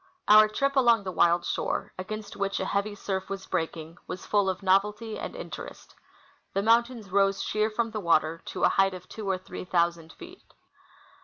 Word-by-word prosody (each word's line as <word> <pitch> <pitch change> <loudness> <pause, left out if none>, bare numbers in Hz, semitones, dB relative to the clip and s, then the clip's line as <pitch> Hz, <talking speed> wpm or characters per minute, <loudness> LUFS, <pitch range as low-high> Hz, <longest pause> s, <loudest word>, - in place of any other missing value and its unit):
Our 215 0 +8
trij^ 275 +6 0
along 235 -5 +4
the 185 - -4
wild 175 -1 +3
shore, - - -2
against 210 +3 -6
which 200 0 -1
a - - -2
heavy 205 +1 -1
surf 190 -2 -4
was 195 -1 -5
breaking, 165 -1 -4
was 180 - -6
full 205 -2 +2
of 190 +1 -4
nov 190 +1 +5
elty 210 +2 -7
and - - -6
interest. - - -9 0.6
The 195 - +1
mountains 230 -2 +2
rose 195 0 +2
sheer 215 +1 0
from 230 +1 -2
the 215 - -3
water 165 -2 +1
to - - -5
a - - +6
height 195 -1 +2
of 180 0 -11
two 215 -3 -6
or 190 - +1
three 185 - -8
thousand 170 -2 0
feet. 360 +1 -14
195 Hz, 190 wpm, -27 LUFS, 185-215 Hz, 0.6 s, Our